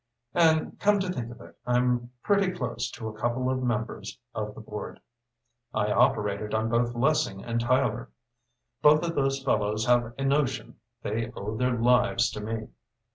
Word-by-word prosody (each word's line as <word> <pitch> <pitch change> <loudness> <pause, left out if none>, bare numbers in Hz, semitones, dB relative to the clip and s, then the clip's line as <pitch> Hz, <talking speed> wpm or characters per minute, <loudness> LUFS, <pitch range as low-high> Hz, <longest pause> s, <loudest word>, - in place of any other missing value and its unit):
And, 160 -2 +3
come 205 0 +4
to 185 -1 -1
think 120 -8 -4
of 120 - -12
it, - - -14
I'm 125 0 +1
pretty 200 -2 +3
close 125 -10 -3
to 120 -2 -7
a 110 - -5
couple 120 +4 -1
of 130 0 -1
members 120 -2 -3 0.2
of 105 -1 -4
the - - -9
board. 105 -1 -7 0.8
I 105 - +1
operated 105 0 +2
on 110 +1 0
both 120 +1 +1
Lessing 120 -7 +1
and 115 0 -1
Tyler. 120 -1 +1 0.7
Both 150 +2 +6
of 170 -1 -1
those 135 -2 0
fellows 110 -4 +1
have 120 -1 +2
a 135 - -3
notion 135 -1 0 0.2
they 110 +2 -2
owe 105 +2 -4
their 125 +1 +1
lives 120 0 +3
to 105 - -6
me. 110 +1 -4
120 Hz, 170 wpm, -27 LUFS, 110-135 Hz, 0.8 s, Both